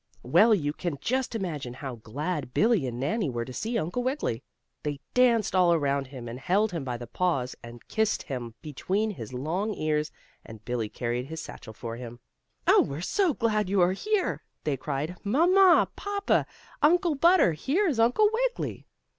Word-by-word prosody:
Well, 225 -1 +5
you 145 -6 -1
can 170 -3 -4
just 255 - -1
imagine 150 - -4
how 130 -3 -6
glad 140 +5 -4
Billie 215 - +3
and 120 -1 -5
Nannie 155 - 0
were 120 -2 -3
to 130 - -9
see 230 - -2
Uncle 180 +6 -2
Wiggily. 255 - -1 0.4
They 145 -2 -3
danced 235 -6 +3
all 175 -2 +5
around 140 -3 0
him, 130 -3 -9
and 120 +2 -6
held 200 +8 +1
him 165 -5 -3
by 125 -2 -3
the 120 - -7
paws, 130 -1 -1
and 120 0 -12
kissed 220 -1 0
him 120 -4 -6
between 190 +8 -1
his 120 - -8
long 175 +12 -2
ears, 150 0 -1 0.3
and 110 -1 -12
Billie 115 -3 -2
carried 120 +2 -3
his 160 +2 -6
satchel 110 -7 -9
for 115 +1 -6
him. 120 -1 -8 0.5
"Oh, - - +6
we're 140 +3 -3
so 345 - +1
glad 215 -4 0
you 200 0 +2
are 175 +1 +4
here!" 420 - -1 0.2
they 150 - 0
cried. 150 +6 -4
"Mamma! 350 - +5
Papa! 405 0 0 0.3
Uncle 345 +1 +4
Butter! 335 - +5
Here 285 - 0
is 275 -9 0
Uncle 245 - +4
Wiggily!" - - -2
170 Hz, 180 wpm, -27 LUFS, -, 0.5 s, Oh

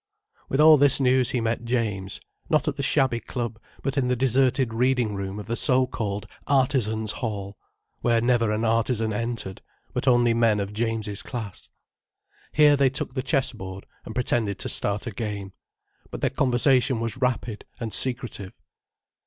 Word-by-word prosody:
With 135 - -1
all 155 0 +8
this 140 -1 +6
news 130 -2 +3
he 125 - 0
met 115 +1 -1
James—not 115 - -2
at 150 - 0
the 140 - -4
shabby 135 -3 +2
club, 115 -2 -5 0.2
but 135 0 0
in 125 - 0
the 125 - +1
deserted 130 -1 +2
reading 125 -2 +1
room 100 0 -5
of 105 - -7
the 115 - -2
so 130 +1 +3
called 105 -5 -4 0.2
Artizans 120 -6 +1
Hall—where 105 +2 -4
never 115 -2 +2
an 110 +2 -1
artizan 115 0 +1
entered, 115 -4 -3 0.3
but - - -2
only 120 -2 +4
men 115 -2 +2
of 100 +1 -4
James's 110 -2 -2
class. 110 -7 -7 0.8
Here 150 -1 +5
they 140 -1 +3
took 130 -1 -4
the 130 - -2
chessboard 110 -9 -2 0.2
and 110 - -9
pretended 115 -5 0
to - - -4
start 100 +2 +1
a 120 - -4
game. 100 -2 -5 0.6
But - - -7
their - - +1
conversation 130 0 +2
was 115 +2 -3
rapid 125 -4 -2
and 115 -2 -5
secretive. 120 -7 -2
120 Hz, 160 wpm, -25 LUFS, 105-130 Hz, 0.8 s, all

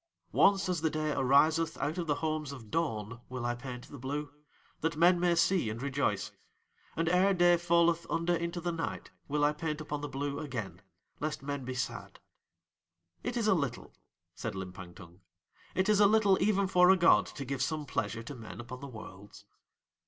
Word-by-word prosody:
Once 195 -1 +4
as 180 -4 -1
the 160 - +2
day 155 0 -1
ariseth 155 +5 +3
out 160 +5 -2
of 170 - -3
the 145 - +2
homes 155 -2 -2
of 115 -6 -10
dawn 115 -8 -2
will 125 -1 -4
I 120 - +1
paint 125 0 -8
the 140 - -10
Blue, 145 +3 -4 0.5
that 160 0 -1
men 175 +2 +5
may 175 -1 +3
see 170 - +2
and 110 +1 -5
rejoice; 135 -6 -1 0.6
and 165 0 0
ere 185 +3 +4
day 175 0 +5
falleth 170 0 +2
under 170 +1 +1
into 170 +1 -3
the 175 0 -2
night 165 -1 -4 0.2
will 150 0 0
I 150 - +3
paint 155 -1 -3
upon 150 -1 -4
the 145 - -4
Blue 140 +1 -3
again, 110 - -5 0.4
lest 150 -2 -3
men 140 -2 -4
be 130 0 -4
sad. 130 - -5 1.0
"It 245 0 -3
is 225 -2 +1
a 205 - +5
little," 140 -9 -3 0.4
said - - -5
Limpang 90 -1 -8
Tung, 90 0 -14 0.5
"it 190 +1 +2
is 210 -1 +4
a 205 - +7
little 205 -2 +4
even 200 -1 +3
for 180 -1 +5
a 190 - +7
god 165 - +5
to 140 - -7
give 135 0 -3
some 155 +2 -1
pleasure 115 -3 -3
to 130 - -7
men 110 -6 -9
upon 120 +2 -8
the 140 - -7
Worlds." 105 -4 -11
150 Hz, 195 wpm, -31 LUFS, 125-170 Hz, 1.0 s, a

